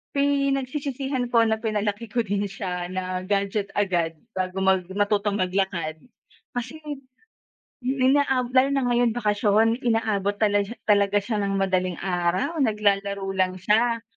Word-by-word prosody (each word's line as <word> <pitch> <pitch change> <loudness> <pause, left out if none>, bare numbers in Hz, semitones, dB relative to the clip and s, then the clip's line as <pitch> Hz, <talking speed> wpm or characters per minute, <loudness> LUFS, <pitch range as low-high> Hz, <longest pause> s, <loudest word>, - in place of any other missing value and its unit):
pinagsisisihan 275 -1 0
ko 235 -1 +4
na 220 -1 +1
pinalaki 215 0 -2
ko 235 +3 0
din 205 -1 -1
siya 180 -2 -4
na 185 0 -3
gadget 200 0 0
agad 175 -5 0 0.2
bago 185 -1 -2
mag 190 -2 +2
matutong 205 0 +1
maglakad. 185 -4 -1 0.6
Kasi 255 +6 -4 1.1
inaa 265 0 +3
lalo 260 +1 +4
na 275 - +1
ngayong 240 -1 +2
bakasyon, 215 0 +2
inaabot 215 -3 +1
tal 205 -1 +4 0.3
talaga 205 0 +4
siya 215 +1 -2
ng 195 - -1
madaling 185 -2 0
araw 185 - 0
naglalaro 200 -4 +1
lang 185 -1 0
siya, 225 +5 +1
205 Hz, 125 wpm, -24 LUFS, 190-240 Hz, 1.1 s, ko